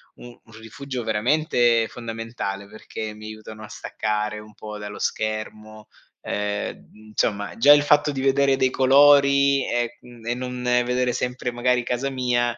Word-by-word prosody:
u 120 - -12 0.2
un 115 - -20
rifugio 125 +3 -6
veramente 120 0 +2
fondamentale, 115 -4 -6
perché 110 0 -7
mi 105 0 -12
aiutano 110 0 -9
a - - -8
staccare 105 0 -3
un 105 0 -14
po' 105 0 -8
dallo 105 0 -7
schermo; 110 0 -4 0.3
ehm, 105 0 -4 0.2
insomma 105 -1 -1
già 140 +6 +8
il 145 0 +4
fatto 150 0 +3
di 135 -2 -4
vedere 135 0 +3
dei 130 -1 +2
colori 140 0 +5
e 120 0 -1
mhmm, 120 -2 -15
e 120 - +1
non 125 0 -5
vedere 125 0 +1
sempre 125 0 -3
magari 125 0 +1
casa 125 +3 -2
mia, 120 -2 0
120 Hz, 155 wpm, -23 LUFS, 110-130 Hz, 0.3 s, già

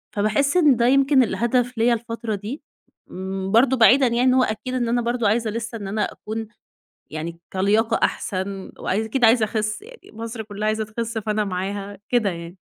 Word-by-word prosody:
فباحس 215 - +1
إن 300 -7 +5
ده 235 0 +1
يمكن 275 0 +4
الهدف 245 +1 0
ليَّ 235 +2 +3
الفترة 230 -1 -3
دي، 215 +10 -6 0.5
م 190 +1 -5
برضه 250 +4 +4
بعيدًا 255 +3 +6
يعني 240 +1 +1
إن 255 - +4
هو 255 0 +4
أكيد 250 +4 -3
إن 245 -2 0
أنا 240 +1 +1
برضه 240 -1 0
عايزة 225 +2 +1
لسه 230 +1 -4
إن 200 -3 -7
أنا 210 +2 -2
أكون 220 +1 -6 0.6
يعني 165 +2 -5
كلياقة 215 +4 +2
أحسن 190 0 -2
وعايز 210 +4 -1
أكيد 240 +2 0
عايزة 225 0 +5
أخِس، 215 - -2
يعني 475 +2 -15
مصر 225 0 -6
كلّها 210 0 -5
عايزة 215 0 0
تخِس 225 +1 -4
فأنا 215 0 -1
معاها، 195 +1 -4
كده 230 -5 +2
يعني. 170 +1 -8
225 Hz, 185 wpm, -22 LUFS, 205-245 Hz, 0.6 s, بعيدًا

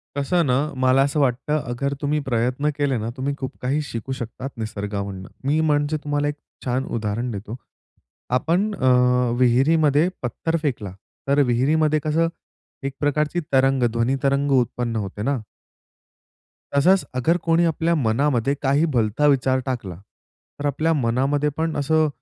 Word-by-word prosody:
कसं 170 +5 +1
ना, 125 -2 +2 0.2
मला 130 +1 +4
असं 145 +2 0
वाटतं 140 +2 +1
अगर 140 +3 -2
तुम्ही 150 +1 0
प्रयत्न 125 +4 0
केले 140 -3 +1
ना, 110 +1 -3
तुम्ही 135 +2 -1
खूप 130 - -4
काही 140 +4 0
शिकू 115 +3 -5
शकतात 125 +3 -6
निसर्गामधून. 100 -3 -4 0.2
मी 150 +3 +2
म्हणजे 150 0 +1
तुम्हाला 145 0 0
एक 145 - -2 0.3
छान 130 +2 0
उदाहरण 115 +3 -2
देतो. 105 +2 -6 0.8
आपण 180 +10 +1
अ, 130 -6 +2 0.5
विहिरीमध्ये 145 +5 +3
पत्थर 165 +7 -1
फेकला. 115 -10 -2 0.4
तर 140 +1 +3
विहिरीमध्ये 150 +5 +2
कसं 160 +2 +2 0.6
एक 135 - -3
प्रकारची 150 +3 0
तरंग, 135 0 +3
ध्वनी 120 +3 +1
तरंग 140 +1 +1
उत्पन्न 120 -1 -1
होते 105 -1 -4
ना? 135 +4 0 1.4
तसंच, 185 +7 +4
अगर 165 +8 +2
कोणी 165 +1 +3
आपल्या 165 +1 +1
मनामध्ये 135 0 +1
काही 140 +3 +2
भलता 115 +4 +1
विचार 130 -1 +3
टाकला, 115 -9 -4 0.6
तर 145 - -4
आपल्या 160 +3 +1
मनामध्ये 140 +3 +1
पण 160 0 -1
असं 155 +2 +2
140 Hz, 145 wpm, -22 LUFS, 120-150 Hz, 1.4 s, मला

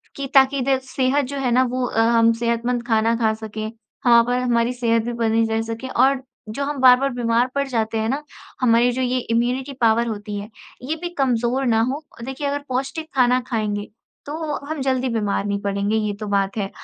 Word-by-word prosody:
कि 280 -1 -4
ताकि 270 0 +5
द 265 - +4
सेहत 265 +2 0
जो 280 +2 -6
है 255 -2 0
ना 255 +2 +4
वो 255 0 -1
अ, 225 - 0
हम 230 0 +4
सेहतमंद 235 +1 -1
खाना 225 0 +2
खा 220 -2 +2
सकें। 220 0 -6 0.3
हाँ, 235 -1 +7
पर 245 +1 0
हमारी 240 -1 +1
सेहत 230 -2 +1
भी 240 +1 -3
बनी 225 -1 +1
रह 220 0 0
सके 225 +3 -5
और 265 +1 +2 0.3
जो 275 +6 -3
हम 290 0 -3
बार-बार 260 +1 +6
बीमार 240 0 +1
पड़ 280 0 0
जाते 225 -3 -1
हैं 220 0 -1
ना, 275 +4 -1 0.4
हमारी 240 0 +4
जो 255 +2 -2
ये 255 0 0
इम्यूनिटी 250 +4 0
पावर 230 +1 +3
होती 210 -2 -5
है 205 +1 -8 0.4
ये 315 - 0
भी 350 - -3
कमज़ोर 250 0 +1
ना 225 -3 +3
हो। 285 +3 -4 0.2
देखिए 265 +2 -4
अगर 285 +1 -1
पौष्टिक 270 +5 -3
खाना 250 -1 +4
खाएँगे, 210 -3 -2 0.4
तो 300 0 -4
हम 310 -1 -4
जल्दी 260 -1 0
बीमार 210 -3 -1
नहीं 200 0 -1
पड़ेंगे, 200 +1 -1
ये 210 -1 -1
तो 215 - -5
बात 195 +1 0
है 200 -2 -2
240 Hz, 205 wpm, -21 LUFS, 225-265 Hz, 0.4 s, हाँ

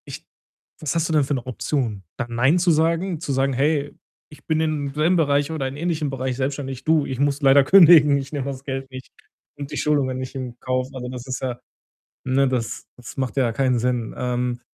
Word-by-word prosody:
Ich - - -9 0.6
was 150 -1 -2
hast 165 0 0
du - - -1
denn 150 -2 +4
für 140 - -2
'ne 125 - -5
Option? 125 -5 -2
Da 120 - -2
„Nein“, 125 +8 +2
zu 175 0 +3
sagen? 165 +2 +1
Zu 150 - -4
sagen: 135 +1 +1
„Hey, 145 +2 0 0.3
ich 150 - -17
bin 160 -1 0
in 155 -3 -1
dem - - -10
selben 160 +4 +2
Bereich 145 -2 +1
oder 145 -4 -2
in 135 +2 -7
ähnlichen 160 -2 -1
Bereich 130 -1 -3
selbstständig. 135 -1 -3
Du, 155 -2 +2
ich 130 -1 -5
muss 140 +1 +1
leider 135 0 +6
kündigen, 160 -4 +7
ich 135 -1 -6
nehme 140 -3 -2
das 135 -1 -5
Geld 135 -1 -5
nicht 130 0 -10 0.5
und 140 0 -7
die - - -4
Schulungen 140 -4 +1
nicht 130 0 -6
in 125 -2 -6
Kauf.“ 130 0 -1
Also, 125 -2 -6
das 125 0 -8
ist 130 - -4
ja 125 -2 -3 0.7
ne, 135 +1 +2
das 125 -4 -3
das 120 -3 -11
macht 130 -1 -3
ja 125 -4 +2
keinen 130 +1 +1
Sinn. 120 -1 -1
Ähm, 125 0 -2
135 Hz, 220 wpm, -22 LUFS, 130-150 Hz, 0.7 s, kündigen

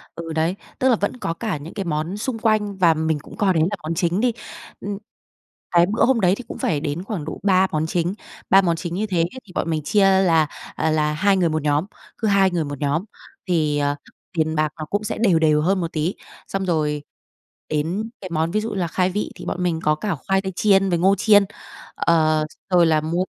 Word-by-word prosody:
ừ, 165 -1 -6
đấy, 165 +4 0 0.2
tức 260 - +3
là 245 - +5
vẫn 205 +4 -2
có 165 - -2
cả 205 -3 -3
những 150 +4 -9
cái 195 - -4
món 160 +5 -2
xung 240 +1 -3
quanh 215 -3 +1
và 170 -3 +5
mình 160 -1 -1
cũng - - -13
coi 195 -3 +2
đấy 160 - +3
là - - -1
món 160 +2 -2
chính 175 +2 +1
đi. 245 -1 +2 0.5
Ưm, 200 0 -4 0.7
cái 170 0 +5
bữa 215 +5 +2
hôm 255 -2 +3
đấy 180 0 +4
thì 250 - -7
cũng - - -7
phải 150 -4 0
đến 155 +4 -3
khoảng 195 -8 -4
độ - - -6
3 190 -1 +4
món 155 0 0
chính, 175 +2 0 0.4
3 195 +1 +7
món 170 -3 +1
chính 170 0 -5
như 215 +2 -1
thế 185 -4 -2
ấy 170 +1 +2 0.2
thì 180 - -15
bọn 165 - -1
mình 155 -2 -1
chia 205 +6 +2 0.2
là 165 -4 +3 0.3
là 155 -1 +1
2 195 +5 +2
người 175 -3 +2
một 155 -1 -1
nhóm, 150 +3 +1 0.3
cứ 225 - -1
2 195 -2 +4
người 170 -2 0
một 145 -1 -6
nhóm 145 +5 0 0.4
thì, 155 -4 +1
ờ, 145 0 +1 0.4
tiền 160 0 +1
bạc 155 0 +1
nó 155 - -4
cũng 205 +5 -2
sẽ - - -3
đều 195 -7 +3
đều 155 -1 +3
hơn 190 +4 +2
một 165 - -4
tí. 160 +4 -1 0.3
Xong 195 0 -2
rồi 150 -4 0 0.7
đến 170 +9 -1
cái 185 - -6
món 160 +1 0
ví 215 +3 +1
dụ 225 - -3
như - - -4
là 180 -3 0
khai 180 +3 +1
vị 205 +3 -3
thì - - -10
bọn 180 - -2
mình 170 -2 0
có 150 0 +3
cả 195 +3 -2
khoai 195 0 +2
tây 190 -1 -5
chiên 195 -2 +3
với 175 -2 +1
ngô 195 +3 +4
chiên, 205 -1 +5 0.5
ờ, 155 -2 +2 0.2
rồi 175 -2 +5
là 155 -1 +3
mua 170 +4 0
175 Hz, 240 wpm, -22 LUFS, 155-195 Hz, 0.7 s, 3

